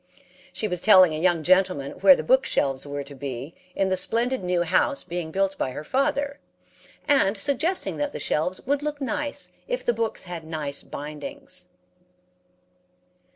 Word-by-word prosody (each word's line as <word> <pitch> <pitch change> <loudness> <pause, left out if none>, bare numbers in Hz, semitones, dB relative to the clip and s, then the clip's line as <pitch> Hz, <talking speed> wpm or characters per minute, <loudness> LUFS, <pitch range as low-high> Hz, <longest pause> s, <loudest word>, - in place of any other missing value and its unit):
She 215 - -2
was 180 -3 -3
telling 185 -6 +7
a 155 - -3
young 175 -2 +2
gentleman 180 -5 +2
where 190 -1 +8
the 155 - -4
book 260 +11 +4
shelves 135 - -1
were 145 0 -4
to 140 +1 -11
be 135 +2 -6 0.2
in 195 -1 +1
the 190 - +2
splendid 240 +3 0
new 180 -1 +1
house 280 - +1
being 170 -2 -4
built 195 +3 0
by 130 - -1
her 150 - -6
father, 280 - 0 0.7
and 220 -8 +3
suggesting 290 - +1
that 290 0 -1
the - - -6
shelves 180 +5 -1
would 285 +2 0
look 295 0 -3
nice 290 +1 -2 0.2
if - - -3
the 240 - +2
books 225 0 -2
had 175 -3 -6
nice 155 -3 -2
bindings. 180 - -7
185 Hz, 165 wpm, -25 LUFS, -, 0.7 s, where